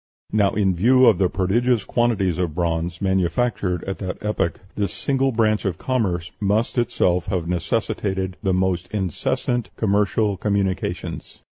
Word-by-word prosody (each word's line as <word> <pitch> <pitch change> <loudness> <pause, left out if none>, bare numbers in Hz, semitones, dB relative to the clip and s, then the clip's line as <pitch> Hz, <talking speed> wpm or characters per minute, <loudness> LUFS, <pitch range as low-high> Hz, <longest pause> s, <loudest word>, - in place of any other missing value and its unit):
Now, 105 -2 +2
in 95 -2 +2
view 125 +9 +5
of 110 -7 +5
the 95 -2 +3
prodigious 105 +5 +1
quantity 115 -6 +1
of 80 -4 -2
bronze 85 +1 -1
manufactured 95 0 0
at 95 - -5
that 95 -2 -4
epoch, 105 -6 -1
this 100 -4 -1
single 135 -1 0
branch 110 -2 +1
of 95 -5 -1
commerce 95 -10 -1
must 105 +3 +1
itself 90 -7 +1
have 85 -3 -1
necessitated 95 +1 -1
the 95 - +1
most 90 -1 0
incessant 105 +5 -2
commercial 105 0 +1
communications." 100 -1 -2
95 Hz, 140 wpm, -22 LUFS, 90-110 Hz, -, view